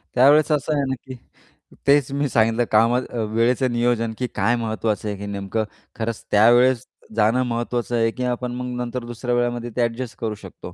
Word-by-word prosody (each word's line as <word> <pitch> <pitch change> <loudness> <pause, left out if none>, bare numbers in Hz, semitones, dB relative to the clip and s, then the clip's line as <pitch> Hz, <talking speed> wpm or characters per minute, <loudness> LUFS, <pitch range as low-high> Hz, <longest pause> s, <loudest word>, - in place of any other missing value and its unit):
त्यावेळेस 145 +5 +5
असं 150 +1 +1
आहे 140 -1 +1
ना, 130 - 0
की 130 - -7 0.7
तेच 140 -1 +4
मी 145 +1 0
सांगितलं 115 0 +2
काम 115 +2 +4 0.4
वेळेचं 120 +2 +2
नियोजन 120 -1 0
की 125 - -2
काय 120 +1 +2
महत्त्वाचं 110 -2 -2
आहे 100 - -4
की 100 - -7
नेमकं 100 +2 -2 0.4
खरंच 115 0 -3
त्यावेळेस 120 +3 +5 0.3
जाणं 115 +4 +3
महत्त्वाचं 120 0 -2
आहे 115 -1 +2
की 125 - -5
आपण 125 0 -2
मग 125 0 -4
नंतर 120 0 -4
दुसऱ्या 120 +1 -3
वेळामध्ये 120 0 -1
ते 125 - +1
ॲडजस्ट 115 +1 -7
करू 110 -2 -2
शकतो. 95 -2 -11
120 Hz, 180 wpm, -22 LUFS, 115-125 Hz, 0.7 s, त्यावेळेस